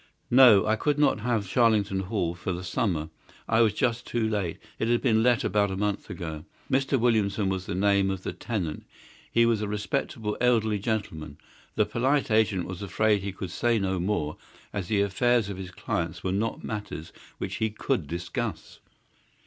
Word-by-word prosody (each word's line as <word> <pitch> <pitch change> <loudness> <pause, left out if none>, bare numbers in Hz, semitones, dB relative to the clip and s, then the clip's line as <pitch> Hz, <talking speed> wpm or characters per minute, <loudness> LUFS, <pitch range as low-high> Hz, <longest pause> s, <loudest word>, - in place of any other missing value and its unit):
No, 120 -6 +8
I 110 - +2
could 145 +5 0
not 145 -5 +3
have 110 -3 -1
Charlington 105 -4 +2
Hall 95 -3 -1
for 90 +2 -4
the 90 +1 -4
summer. 90 -5 -1 0.4
I 110 +1 +3
was 110 -2 +4
just 120 +2 -1
too 115 -2 0
late. 100 -6 -2 0.2
It 110 - 0
had 120 0 +3
been 110 -1 +3
let 120 0 +3
about 100 -1 +2
a 95 - -3
month 105 0 -2
ago. 80 -4 -6 0.3
Mr. 135 0 +2
Williamson 105 -4 +2
was 95 -1 -3
the - - -3
name 100 0 +3
of 95 -1 -3
the - - -3
tenant. 95 -10 -4 0.5
He 115 0 +4
was 115 -2 +2
a 105 - -1
respectable 105 +1 -2
elderly 110 -4 +2
gentleman. 95 -9 -3 0.4
The 105 - +3
polite 130 +5 +1
agent 110 -4 +2
was 95 0 -7
afraid 105 +1 +1
he 100 +1 -3
could 95 -1 -6
say 120 +4 +1
no 95 -3 -1
more, 85 -5 -1 0.4
as 100 -4 -3
the 105 0 +2
affairs 115 +2 +2
of 100 - -5
his 95 -1 -6
clients 85 -2 -3
were 95 - -1
not 110 +4 -2
matters 105 -7 -6 0.2
which - - -4
he 110 - 0
could 95 -6 -2
discuss. 85 +3 -4
105 Hz, 185 wpm, -27 LUFS, 95-115 Hz, 0.5 s, No